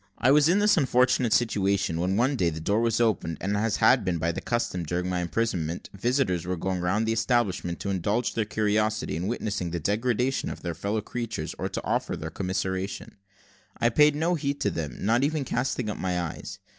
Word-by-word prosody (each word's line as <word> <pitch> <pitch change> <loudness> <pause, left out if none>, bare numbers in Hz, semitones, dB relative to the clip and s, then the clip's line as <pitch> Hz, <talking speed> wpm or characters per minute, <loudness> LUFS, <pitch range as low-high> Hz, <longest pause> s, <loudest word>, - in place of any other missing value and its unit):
I 130 - +3
was 150 +2 +5
in 180 - +4
this 210 -1 +4
unfortunate 125 -4 +3
situation, 100 -7 +1
when 95 +2 0
one 130 +5 +2
day 90 -9 +2
the 80 -1 -5
door 100 +7 +1
was 115 -1 +1
opened, 100 -8 +1
and, 100 +2 -1
as 105 +1 +1
had - - +4
been 90 - 0
often 85 +1 0
the - - -4
custom 120 -7 -1
during 90 +3 -2
my 90 -1 -1
imprisonment, 90 -3 -2
visitors 110 - 0
were 90 +1 -2
going 95 +2 -2
round 95 +5 +1
the 110 - +1
establishment, 110 -8 0
to 100 - -2
indulge 100 +6 0
their 110 - 0
curiosity, 105 -2 0
in 85 +4 -2
witnessing 105 -6 -2
the 85 0 -3
degradation 120 - 0
of - - -7
their 85 -1 -2
fellow 100 +6 -2
creatures, 115 -8 -4
or - - -2
to - - -4
offer - - -1
their 80 0 -6
commiseration. 95 +1 -3 0.6
I 120 - +3
paid 150 +4 +5
no 165 +4 +1
heed 145 -3 -2
to - - +1
them, 75 -4 -4
not 115 +5 +3
even 150 -1 0
casting 125 -1 -1
up 105 - -4
my 90 -1 -1
eyes. 85 -2 -5
105 Hz, 205 wpm, -26 LUFS, 90-120 Hz, 0.6 s, was